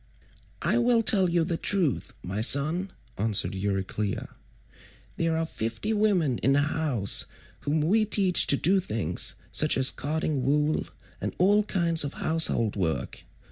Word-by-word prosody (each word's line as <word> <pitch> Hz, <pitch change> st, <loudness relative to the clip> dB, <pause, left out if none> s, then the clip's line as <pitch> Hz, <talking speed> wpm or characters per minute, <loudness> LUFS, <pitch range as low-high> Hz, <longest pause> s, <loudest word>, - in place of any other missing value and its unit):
176 -, -, 0 dB
"I -, -, +2 dB
will 235 Hz, -1 st, +2 dB
tell 195 Hz, -4 st, +3 dB
you 170 Hz, -1 st, +1 dB
the 165 Hz, 0 st, -2 dB
truth, 180 Hz, -8 st, -1 dB
my 95 Hz, +4 st, -4 dB
son," 155 Hz, -, +1 dB, 0.3 s
answered 105 Hz, -2 st, +2 dB
Euryclea. 100 Hz, +1 st, -3 dB, 0.9 s
"There 165 Hz, -1 st, -1 dB
are 165 Hz, -, -1 dB
fifty 115 Hz, -, -4 dB
women 190 Hz, -, +1 dB
in 135 Hz, +4 st, +1 dB
the 145 Hz, -, +2 dB
house 145 Hz, -9 st, +1 dB, 0.3 s
whom 150 Hz, +2 st, -1 dB
we 210 Hz, +8 st, +2 dB
teach 195 Hz, -4 st, +2 dB
to 140 Hz, -, +3 dB
do 190 Hz, +7 st, +2 dB
things, 105 Hz, -, -1 dB, 0.2 s
such 155 Hz, -, +3 dB
as 130 Hz, 0 st, +7 dB
carding 150 Hz, -1 st, -3 dB
wool, 150 Hz, +4 st, 0 dB, 0.3 s
and -, -, -4 dB
all 205 Hz, +4 st, +3 dB
kinds 170 Hz, -6 st, +1 dB
of 145 Hz, -, -5 dB
household 155 Hz, -9 st, +1 dB
work. 85 Hz, -5 st, -4 dB
155 Hz, 150 wpm, -26 LUFS, 115-180 Hz, 0.9 s, as